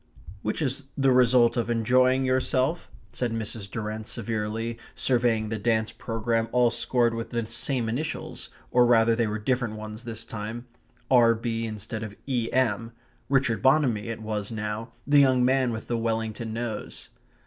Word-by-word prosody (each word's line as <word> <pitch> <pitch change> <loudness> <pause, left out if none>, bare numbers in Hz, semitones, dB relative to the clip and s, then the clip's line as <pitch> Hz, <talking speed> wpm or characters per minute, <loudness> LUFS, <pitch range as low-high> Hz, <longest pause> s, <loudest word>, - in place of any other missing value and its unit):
"Which 110 +9 -1
is 135 0 -2
the 135 -1 +4
result 125 -1 +5
of 120 0 0
enjoying 130 +3 +3
yourself," 130 +4 0 0.2
said 125 -2 -1
Mrs. 110 -2 -4
Durrant 110 0 -4
severely, 115 +1 -3 0.2
surveying 120 -4 +1
the 110 -1 -3
dance 110 0 +1
programme 115 0 -1
all 125 -1 +4
scored 120 -1 +1
with 115 0 -4
the 115 -2 -2
same 115 +2 -2
initials, 140 +8 -4 0.2
or 125 -1 +5
rather 115 -1 +5
they 115 -1 +1
were 105 +1 -2
different 120 0 -1
ones 110 +1 -7
this 115 -1 -6
time 115 +1 -6 0.5
R.B. 115 -2 +3
instead 110 +1 -5
of 105 -2 -6
E.M.; 120 -3 0 0.4
Richard 130 -6 +2
Bonamy 130 -6 +3
it 115 -1 -5
was 105 -1 -3
now, 110 +1 -4
the 145 +1 +5
young 130 -3 +4
man 130 -1 +2
with 110 -1 -6
the 120 -1 -1
Wellington 115 0 -2
nose. 115 -1 -5
115 Hz, 155 wpm, -26 LUFS, 110-125 Hz, 0.5 s, result